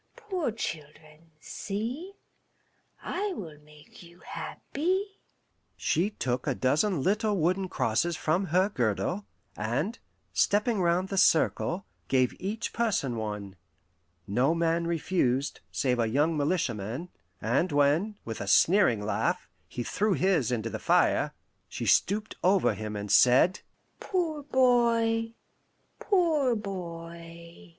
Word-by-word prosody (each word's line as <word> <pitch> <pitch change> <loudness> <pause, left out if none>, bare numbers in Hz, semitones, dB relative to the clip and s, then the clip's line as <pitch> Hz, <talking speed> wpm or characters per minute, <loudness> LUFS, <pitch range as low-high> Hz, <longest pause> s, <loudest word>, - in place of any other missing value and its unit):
Poor 380 - -2
children, 155 -5 -7
see, 235 - -5 0.9
I 395 +2 -2
will 160 - -8
make 150 0 -17
you 175 0 -16
happy." 380 +6 -3 0.6
She 180 +5 +1
took 125 - -3
a 135 - +1
dozen 150 +6 +1
little 210 +1 +1
wooden 185 +3 +1
crosses 160 +9 0
from 170 +5 0
her 185 +4 +2
girdle, 140 - -1 0.3
and, 135 - -2 0.3
stepping 210 0 +2
round 175 +2 +1
the 195 - 0
circle, 175 +1 +2 0.2
gave 130 -2 +2
each 210 +5 -3
person 195 - 0
one. 105 -3 -5 0.7
No 130 +10 +2
man 170 0 +1
refused, 145 -5 0
save 125 -3 0
a 115 - +2
young 150 +7 +2
militiaman; 140 - -2 0.3
and 135 +11 +1
when, 145 +9 +2
with 115 -1 -5
a 100 - -5
sneering 160 - +4
laugh, 110 - -1 0.2
he 120 - -5
threw 210 - 0
his 175 - +1
into 115 -2 -2
the - - -4
fire, - - +2 0.3
she - - -5
stooped 210 +3 +2
over 190 +1 +3
him 110 -1 -5
and 105 0 -4
said, 130 +10 +5 0.4
"Poor 330 -6 -1
boy! 235 -4 +2 0.6
poor 320 - +2
boy!" 170 - -8
170 Hz, 120 wpm, -28 LUFS, 135-210 Hz, 0.9 s, said